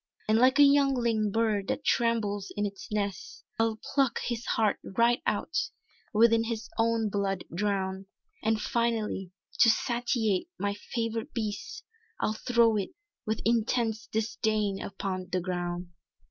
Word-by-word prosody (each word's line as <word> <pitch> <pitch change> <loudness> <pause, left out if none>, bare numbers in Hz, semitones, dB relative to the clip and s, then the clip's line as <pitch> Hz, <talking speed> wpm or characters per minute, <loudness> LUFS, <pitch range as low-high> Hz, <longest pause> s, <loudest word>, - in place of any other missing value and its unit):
"And 215 +1 +4
like 260 +2 +5
a 290 - +8
youngling 255 -6 +3
bird 210 -2 +1
that 285 - -2
trembles 215 -4 +1
in 205 - +1
its 200 0 -7
nest, 205 -2 -3
I'll 225 -1 +2 0.2
pluck 270 -4 +2
his 235 -1 -3
heart 215 -3 +1
right 235 +4 +2
out; 215 +10 -1 0.6
within 225 +1 +5
its 230 -1 -4
own 225 -1 +2
blood 195 -2 -1
drowned, 190 0 -1 0.3
And 220 0 +1
finally 220 -4 -1 0.3
to 230 - +7
satiate 235 - +1
my 205 0 -1
favourite 230 +4 -4
beast, 220 - -4 0.4
I'll 215 - 0
throw 230 -1 +3
it 195 - -3 0.3
with 220 0 -1
intense 225 -1 +1
disdain 215 -2 -1
upon 190 -1 -4
the 185 - +1
ground!" 175 -1 -3
220 Hz, 135 wpm, -29 LUFS, 200-235 Hz, 0.6 s, a